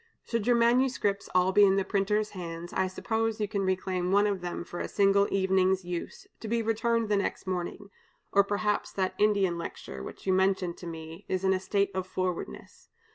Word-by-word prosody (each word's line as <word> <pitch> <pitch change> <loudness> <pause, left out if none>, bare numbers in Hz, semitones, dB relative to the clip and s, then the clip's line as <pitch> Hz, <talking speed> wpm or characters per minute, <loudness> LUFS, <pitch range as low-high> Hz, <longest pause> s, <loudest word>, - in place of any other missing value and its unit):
Should 230 -2 -2
your 245 - +5
manuscripts 235 -4 +2
all 185 +1 +4
be 205 +2 +6
in 195 -1 +5
the 195 -1 +1
printer's 210 +2 0
hands, 170 -2 -7
I 190 0 +1
suppose 225 +3 -2
you 210 - 0
can 200 -1 -2
reclaim 185 -1 -1
one 205 +1 +4
of 200 -3 -1
them 175 -1 -4
for 175 0 -7
a - - -2
single 200 0 +3
evening's 190 -1 +2
use, 180 - -5
to 225 - -7
be 230 +1 0
returned 225 +1 +1
the 210 -1 +2
next 200 - -2
morning, 185 +2 -4 0.4
or 200 - +5
perhaps 205 +1 -1
that 190 -1 -1
Indian 200 -5 +2
lecture, 70 - -7
which - - -9
you 190 - +2
mentioned 190 -2 +1
to 175 - -9
me, 160 +2 -8
is 185 0 -1
in 190 0 +3
a 185 - 0
state 200 +1 0
of 185 -1 -3
forwardness. 180 - -5
195 Hz, 200 wpm, -29 LUFS, 185-210 Hz, 0.4 s, be